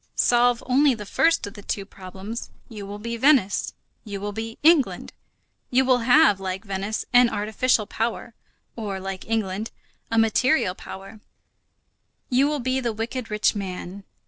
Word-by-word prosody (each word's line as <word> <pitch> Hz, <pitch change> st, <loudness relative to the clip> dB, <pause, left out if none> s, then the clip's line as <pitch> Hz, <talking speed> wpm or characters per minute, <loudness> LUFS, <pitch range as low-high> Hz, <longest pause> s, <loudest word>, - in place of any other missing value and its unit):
Solve 245 Hz, 0 st, +3 dB
only 265 Hz, +1 st, +3 dB
the 210 Hz, -2 st, -8 dB
first 330 Hz, +10 st, +2 dB
of 205 Hz, -, -8 dB
the 205 Hz, -, -11 dB
two 200 Hz, 0 st, -4 dB
problems; 195 Hz, +4 st, -8 dB, 0.2 s
you 210 Hz, -4 st, -8 dB
will 205 Hz, +1 st, -6 dB
be 235 Hz, +2 st, -5 dB
Venice, 255 Hz, -6 st, +2 dB, 0.3 s
you 200 Hz, -3 st, -6 dB
will 205 Hz, +1 st, -4 dB
be 225 Hz, +2 st, -6 dB
England. 315 Hz, -4 st, +3 dB, 0.6 s
You 260 Hz, +1 st, +3 dB
will 255 Hz, -1 st, +4 dB
have, 245 Hz, -3 st, +5 dB
like 190 Hz, +2 st, -4 dB
Venice, 200 Hz, +2 st, -3 dB
an 245 Hz, -1 st, +6 dB
artificial 215 Hz, +2 st, 0 dB
power, 230 Hz, +2 st, -3 dB, 0.4 s
or, 205 Hz, -4 st, -4 dB
like 190 Hz, +2 st, -7 dB
England, 215 Hz, -1 st, -1 dB, 0.4 s
a 225 Hz, -, -1 dB
material 225 Hz, -1 st, +3 dB
power; 195 Hz, +3 st, -10 dB, 1.1 s
you 260 Hz, +3 st, +4 dB
will 300 Hz, 0 st, -1 dB
be 255 Hz, +1 st, 0 dB
the 240 Hz, -3 st, -2 dB
wicked 230 Hz, +2 st, -4 dB
rich 210 Hz, 0 st, +2 dB
man. 190 Hz, -1 st, -6 dB
225 Hz, 155 wpm, -24 LUFS, 200-245 Hz, 1.1 s, an